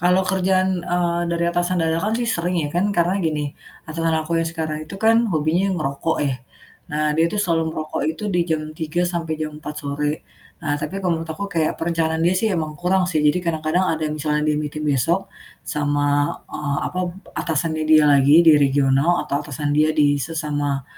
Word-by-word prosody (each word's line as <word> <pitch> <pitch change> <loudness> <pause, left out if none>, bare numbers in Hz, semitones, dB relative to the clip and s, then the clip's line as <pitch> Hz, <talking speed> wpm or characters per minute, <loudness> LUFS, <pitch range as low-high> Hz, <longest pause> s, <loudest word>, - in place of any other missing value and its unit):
Kalau 180 +2 +3
kerjaan, 185 0 +1
eee, 175 0 0
dari 170 0 0
atasan 175 +1 0
dadakan 165 +6 0
sih 240 - -1
sering 180 -5 -1
ya, - - -2
kan 185 +4 +1
karena 175 +3 +2
gini, 150 -4 -1 0.3
atasan 165 0 -1
aku 165 +1 0
yang 165 - -1
sekarang 160 -2 -3
itu 195 - -7
kan 225 +3 +3
hobinya 165 +3 +1
ngerokok 150 +1 -1
ya. 135 -2 0 0.6
Nah 150 0 +1
dia 165 - +4
itu 210 - -4
selalu 165 -5 +1
ngerokok 155 -1 -4
itu 160 +6 -4
di 175 - +2
jam 160 -1 0
3.00 160 +2 -2
sampai 170 -2 -2
jam 155 -1 -3
4.00 150 -1 -6
sore. 145 +2 -2 0.4
Nah 145 -1 0
tapi 155 +5 -4
kalau 175 -4 0
menurut 165 - -7
aku 190 +6 -4
kayak 165 -3 0
perencanaan 165 -1 0
dia 175 - +4
sih 220 +4 +1
emang 160 -4 -2
kurang 185 +1 +2
sih, 155 -3 +1
jadi 150 +4 +3
kadang-kadang 160 +2 0
ada 160 0 -3
yang 150 - -3
misalnya 150 0 0
dia 150 - +2
meeting 150 0 -4
besok 165 +7 +1 0.3
sama, 145 -1 0
eee, 145 -2 -3
apa, 180 - -6 0.4
atasannya 160 0 -1
dia 155 -1 +6
lagi 145 +3 +6
di 165 -2 +7
regional 140 +3 +3
atau 140 - 0
atasan 145 0 -3
dia 155 +1 +3
di 145 -1 +3
sesama 145 -2 -2
160 Hz, 190 wpm, -21 LUFS, 150-175 Hz, 0.6 s, di